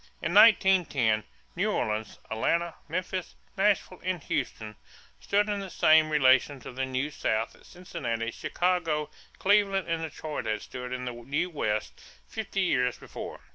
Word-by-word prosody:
In 170 Hz, -, -2 dB
1910, 180 Hz, -, +5 dB, 0.3 s
New -, -, +1 dB
Orleans, 110 Hz, 0 st, -2 dB
Atlanta, 170 Hz, +9 st, 0 dB
Memphis, 185 Hz, 0 st, -3 dB, 0.2 s
Nashville, 195 Hz, -2 st, +1 dB
and 185 Hz, -1 st, -1 dB
Houston 105 Hz, -1 st, -3 dB, 0.4 s
stood 205 Hz, +1 st, +1 dB
in 205 Hz, -1 st, -1 dB
the 195 Hz, -1 st, -6 dB
same 155 Hz, -2 st, +5 dB
relation 135 Hz, -1 st, +4 dB
to -, -, -8 dB
the 130 Hz, +1 st, -3 dB
New 130 Hz, +3 st, -2 dB
South 110 Hz, -5 st, -1 dB
that -, -, -19 dB
Cincinnati, 120 Hz, -11 st, -4 dB
Chicago, 170 Hz, -3 st, -1 dB, 0.3 s
Cleveland, 195 Hz, -2 st, +3 dB
and 165 Hz, -1 st, -1 dB
Detroit 155 Hz, -4 st, -5 dB
had 110 Hz, -1 st, -1 dB
stood 125 Hz, -1 st, -7 dB
to 130 Hz, -, -3 dB
the 125 Hz, 0 st, -4 dB
New 140 Hz, +9 st, -3 dB
West 110 Hz, -8 st, -2 dB, 0.3 s
fifty 210 Hz, -3 st, -3 dB
years 125 Hz, -9 st, +1 dB
before. -, -, -8 dB
155 Hz, 145 wpm, -28 LUFS, 125-185 Hz, 0.4 s, 1910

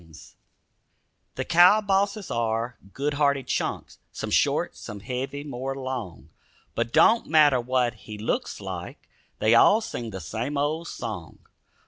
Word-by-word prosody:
DOGIE 80 Hz, -1 st, -19 dB
SONG -, -, -15 dB, 1.0 s
The -, -, -3 dB
cow 180 Hz, +5 st, +6 dB
bosses 200 Hz, 0 st, 0 dB
are 115 Hz, +1 st, -1 dB, 0.2 s
good 145 Hz, +5 st, -2 dB
hearted 140 Hz, -2 st, +1 dB
chunks, -, -, -3 dB
Some -, -, -5 dB
short, -, -, +1 dB
some 105 Hz, -1 st, -9 dB
heavy, 135 Hz, +5 st, -4 dB
more 135 Hz, -1 st, -4 dB
long; 120 Hz, -, -6 dB, 0.4 s
But 115 Hz, 0 st, -2 dB
don't 230 Hz, -, +4 dB
matter 150 Hz, -5 st, +5 dB
what 125 Hz, -1 st, +1 dB
he 105 Hz, -1 st, -10 dB
looks 105 Hz, -, -2 dB
like, -, -, -7 dB, 0.3 s
They 110 Hz, +1 st, +3 dB
all 200 Hz, -, +6 dB
sing 120 Hz, -, -5 dB
the 95 Hz, -3 st, -6 dB
same 115 Hz, -, -4 dB
old 155 Hz, +4 st, -1 dB
song. -, -, -6 dB
130 Hz, 145 wpm, -25 LUFS, 115-150 Hz, 1.0 s, cow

